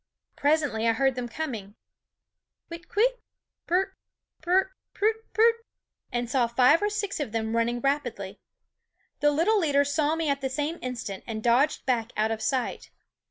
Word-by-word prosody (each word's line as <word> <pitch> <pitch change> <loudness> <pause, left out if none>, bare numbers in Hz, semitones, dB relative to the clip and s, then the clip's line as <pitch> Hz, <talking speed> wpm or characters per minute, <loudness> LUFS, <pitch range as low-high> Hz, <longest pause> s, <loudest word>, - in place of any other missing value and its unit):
Presently 285 -7 +1
I 230 - +4
heard 270 +3 +2
them 245 -1 -5
coming 225 -7 -5 0.9
Whit 335 0 -9
kwit? - - +2 0.5
pr 350 - +1
r - - +6
r, 385 0 -4 0.5
pr - - 0
r 370 - +6
r, 380 0 +1 0.2
prut, 435 +2 +2 0.2
prut! 455 +1 +5 0.6
and 240 0 -1
saw 245 0 +2
five 250 - +4
or 415 - +1
six 410 -3 -3
of 280 -7 -3
them 225 0 -2
running 235 +1 0
rapidly. 240 -8 -2 0.8
The 295 - +4
little 335 +9 +3
leader 285 -5 +3
saw 290 +2 +1
me 325 -1 -1
at 280 -1 0
the 265 - -1
same 295 +5 -2
instant 245 -6 -5
and 220 -2 -4
dodged 250 +5 +2
back 240 -3 0
out 215 +1 +1
of 220 -1 -3
sight. 255 -1 -2
275 Hz, 175 wpm, -27 LUFS, 235-330 Hz, 0.9 s, r